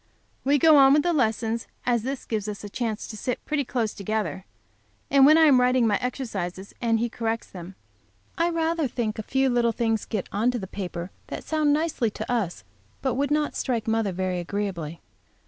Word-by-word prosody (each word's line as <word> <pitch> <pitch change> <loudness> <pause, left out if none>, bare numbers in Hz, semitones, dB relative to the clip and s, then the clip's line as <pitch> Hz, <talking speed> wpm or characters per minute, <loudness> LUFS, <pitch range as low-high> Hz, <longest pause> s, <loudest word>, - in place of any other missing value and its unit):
We 280 +2 +3
go 310 +1 +6
on 270 -1 +7
with 295 0 +4
the 350 - +1
lessons, 225 -4 0 0.2
as 240 -2 +2
this 265 +3 -4
gives 215 -2 -2
us 210 -1 -5
a 205 - -6
chance 225 -1 -3
to 220 - -8
sit 245 +3 -4
pretty 300 -2 0
close 235 -4 -2
together, 205 -1 -3 0.7
and 275 -1 +7
when 310 +2 +7
I 325 - +6
am 275 -5 +6
writing 250 -1 +3
my 210 -2 +3
exercises 200 -7 -4
and 230 -1 +2
he 235 +2 0
corrects 230 -1 -3
them, 180 +1 -9 0.6
I 335 +1 +2
rather 330 -2 0
think 230 -3 -3
a - - 0
few 265 +5 +1
little 240 -2 +2
things 225 -1 0
get 210 -5 -3
on 215 +5 +1
to 250 - -1
the 200 - -5
paper 180 -2 -6 0.2
that - - -6
sound 310 -2 +1
nicely 300 -6 +1
to 215 +3 -6
us, 215 -8 -1 0.4
but 265 - +1
would 280 +2 0
not 300 0 0
strike 235 -5 -1
mother 225 -2 +1
very 185 0 -2
agreeably. 175 -4 -4
230 Hz, 200 wpm, -25 LUFS, 210-270 Hz, 0.7 s, on